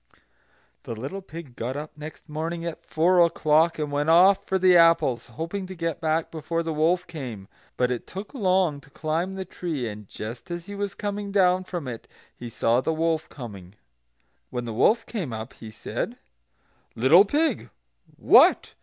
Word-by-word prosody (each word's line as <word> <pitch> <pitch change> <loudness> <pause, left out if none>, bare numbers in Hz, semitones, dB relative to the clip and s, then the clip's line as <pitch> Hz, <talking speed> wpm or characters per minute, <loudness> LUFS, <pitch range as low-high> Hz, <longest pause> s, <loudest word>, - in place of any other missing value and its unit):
The 115 - -6
little 135 - -6
pig 165 -8 -10
got 125 +4 -4
up 150 +1 -7
next 155 +2 -10
morning 165 +2 -4
at 170 -2 -6
four 175 +3 +2
o'clock, 165 0 +3
and 150 -2 -3
went 145 +2 0
off 185 +4 +6
for 190 - 0
the 185 -1 +5
apples, 165 -9 +4
hoping 170 - -5
to 185 - -8
get 165 -2 -3
back 160 0 0
before 165 +1 -3
the 165 -1 -3
wolf 170 +4 +2
came; 125 - -7 0.3
but 125 0 +1
it 120 - -4
took 195 +3 -8
long 185 - +1
to 140 - -20
climb 165 +6 -2
the 190 0 -5
tree, 160 -8 -4
and 105 -1 -8
just 115 - -8
as 175 -1 -5
he 200 - -8
was 200 0 -3
coming 205 0 -4
down 185 -2 +3
from 175 -7 -5
it, 115 -2 -7 0.3
he 120 - -8
saw 115 +2 +1
the 160 - -1
wolf 160 0 -1
coming. 100 -7 -10 0.7
When 120 - -4
the 115 - -4
wolf 210 - +3
came 185 - -4
up 110 +3 -6
he 110 - -11
said: 110 - -5 0.8
"Little 135 - +7
pig, 295 +4 0 0.5
what! - - +5
160 Hz, 180 wpm, -25 LUFS, 130-180 Hz, 0.8 s, Little